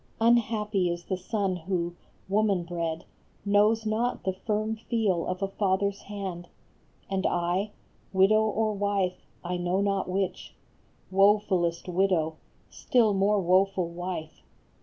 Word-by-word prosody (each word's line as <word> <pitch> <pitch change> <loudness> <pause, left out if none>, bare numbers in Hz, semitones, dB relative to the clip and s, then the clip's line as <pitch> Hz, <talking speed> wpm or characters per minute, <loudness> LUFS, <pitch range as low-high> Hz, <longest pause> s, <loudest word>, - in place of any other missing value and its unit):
Unhappy 220 -5 +2
is 175 0 -3
the 185 - -2
son 190 0 -2
who, 175 0 -2 0.3
woman 200 -2 +2
bred, 170 -1 -3 0.4
Knows 210 +2 +3
not 225 +3 -1
the 190 - 0
firm 215 +3 -2
feel 215 -6 -1
of 185 +2 -3
a - - +1
father 195 0 +1
s 200 - -11
hand; 190 -4 -6 0.6
And 190 -1 0
I, 175 +4 0 0.4
widow 195 +3 +5
or 220 0 0
wife, 200 -2 -1 0.2
I 180 0 -2
know 175 +2 0
not 200 -2 0
which, 190 0 -3 0.6
Wofulest 190 -4 +3
widow, 175 -4 +1 0.3
still 230 -4 +2
more 200 +2 +2
woful 185 0 +2
wife 170 -2 -6
195 Hz, 130 wpm, -27 LUFS, 180-210 Hz, 0.6 s, widow